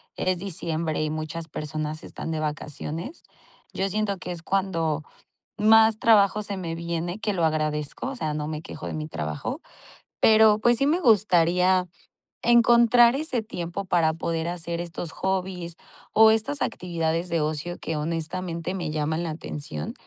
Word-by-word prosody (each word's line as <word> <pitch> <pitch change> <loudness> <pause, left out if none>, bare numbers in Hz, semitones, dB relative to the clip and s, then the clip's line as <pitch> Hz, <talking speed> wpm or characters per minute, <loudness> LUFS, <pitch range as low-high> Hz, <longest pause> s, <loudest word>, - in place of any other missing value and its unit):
es 185 -1 0
diciembre 165 -4 -2
y 155 - 0
muchas 155 +1 -5
personas 155 0 -4
están 165 - -6
de 160 - -2
vacaciones. 155 - -5 0.5
Yo 195 +1 -1
siento 205 0 -1
que 180 - -6
es 170 -2 -7
cuando 165 -5 0 0.5
más 220 0 +5
trabajo 210 -2 +4
se 205 -1 -4
me 170 -3 -4
viene, 170 +3 -3
que 215 -1 -1
lo 170 -3 +1
agradezco, 155 - -1
o - - -6
sea, 155 -11 -2
no 150 0 -3
me 155 0 -4
quejo - - -8
de - - -4
mi 155 -1 -4
trabajo. 75 - -4 0.6
Pero 220 -1 +6
pues 240 +1 +3
sí 275 - +2
me 325 +5 +2
gustaría 185 - +4 0.6
encontrar 235 0 +6
ese 275 -5 -1
tiempo 185 -2 -5
para 165 -3 +2
poder 165 0 -2
hacer 170 -1 -4
estos 170 -1 -6
hobbies, 185 -3 -3 0.4
o 220 0 +7
estas 225 +6 -1
actividades 170 -3 -2
de 165 -1 +1
ocio 155 +3 -3
que 160 - -3
honestamente 165 +2 -3
me 175 -4 -3
llaman 155 +1 -1
la 170 - -3
atención. 145 - -6
170 Hz, 160 wpm, -25 LUFS, 155-205 Hz, 0.6 s, o